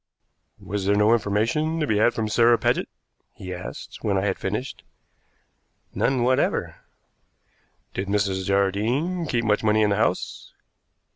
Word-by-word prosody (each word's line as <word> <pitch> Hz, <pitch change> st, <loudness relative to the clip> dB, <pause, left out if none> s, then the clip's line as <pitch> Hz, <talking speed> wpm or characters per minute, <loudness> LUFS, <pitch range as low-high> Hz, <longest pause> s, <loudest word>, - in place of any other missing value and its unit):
"Was 100 Hz, 0 st, -4 dB
there 100 Hz, -, +3 dB
no 105 Hz, +2 st, +4 dB
information 115 Hz, +10 st, 0 dB
to 155 Hz, -, +1 dB
be 110 Hz, -6 st, +1 dB
had 120 Hz, -, +3 dB
from 110 Hz, -1 st, -1 dB
Sarah 115 Hz, +2 st, +4 dB
Paget?" -, -, 0 dB, 0.5 s
he 95 Hz, -1 st, -7 dB
asked, 90 Hz, 0 st, -8 dB
when 100 Hz, -2 st, 0 dB
I 95 Hz, -, 0 dB
had 100 Hz, -, -1 dB
finished. 105 Hz, +7 st, -4 dB, 1.1 s
"None 130 Hz, -2 st, +1 dB
whatever." 130 Hz, +1 st, 0 dB, 1.2 s
"Did 95 Hz, -, -3 dB
Mrs. 100 Hz, -2 st, 0 dB
Jardine 115 Hz, -, 0 dB
keep 115 Hz, -4 st, -1 dB
much 105 Hz, 0 st, +1 dB
money 110 Hz, 0 st, +3 dB
in 105 Hz, -, +2 dB
the 100 Hz, -, +1 dB
house?" -, -, -2 dB
105 Hz, 145 wpm, -24 LUFS, 100-120 Hz, 1.2 s, no